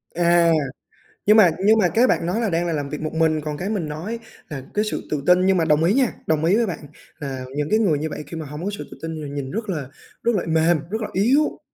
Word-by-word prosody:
À, 170 0 +4 0.7
nhưng 210 +2 +6
mà 190 -5 +8 0.2
nhưng 220 +2 +6
mà 185 - +4
cái 240 +6 +3
bạn - - +1
nói 185 +7 -1
là 225 - 0
đang 170 0 0
là 165 - -1
làm 145 -2 -3
việc 150 - -5
một 155 - -4
mình, 160 -1 +2
còn 150 -1 -4
cái 190 +5 -3
mình 190 -8 -2
nói 180 +10 -5 0.3
là 140 -3 -6
cái 210 +1 +1
sự - - -4
tự 145 -2 -1
tin. 180 +1 +5
Nhưng 190 -1 +3
mà 165 - +2
đồng 155 0 +3
ý 185 +5 +3
nha, 260 -3 +2
đồng 155 0 +1
ý 185 +5 +4
với 235 - +2
bạn 180 -6 -4 0.4
là 135 -3 -5
những 150 0 -1
cái 215 - +3
người 180 -10 +2
như 160 +1 -3
vậy 150 - -6
khi 165 +2 -7
mà 160 - -5
hông 150 +3 -7
có 205 - 0
sự - - -6
tự - - -10
tin 160 0 -4
thì 145 - -6
nhìn 140 -2 -5
rất 215 0 -4
là 150 -8 -3 0.4
rất 235 -2 +2
là 185 - 0
mềm, 160 +1 +3
rất 220 +3 -3
là 215 - -3
yếu. 260 +10 +2
170 Hz, 285 wpm, -22 LUFS, 150-210 Hz, 0.7 s, mà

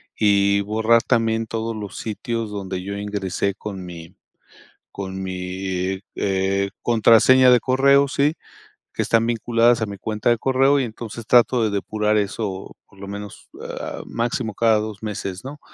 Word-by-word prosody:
y 100 -1 +3
borrar 110 +3 +2
también 115 -2 +1
todos 115 0 -3
los 105 -3 -7
sitios 115 0 -4
donde 95 -2 -5
yo 100 +1 -5
ingresé 100 -1 -2
con 100 -3 -7
mi 85 -2 -10 0.8
con 95 -1 -6
mi 95 0 -3 0.2
eh, 95 0 0
contraseña 120 +3 +5
de 125 - +6
correo, 140 +2 +4
¿sí?, 140 +3 +1 0.6
que - - +1
están 115 0 +2
vinculadas 120 0 +2
a - - +1
mi 100 0 -7
cuenta 105 +3 -2
de 120 - +3
correo, 135 +3 +3
y 135 - 0
entonces 115 0 -8
trato 120 0 +4
de 110 - +1
depurar 105 +1 -1
eso 100 -1 -3
por 100 - -22
lo 100 - -8
menos, 100 0 -9
ah, - - -6
máximo 115 -1 -2
cada 115 0 +3
2 105 0 -6
meses, 100 -2 -5
¿no? 145 +2 -8
105 Hz, 155 wpm, -22 LUFS, 100-115 Hz, 0.8 s, de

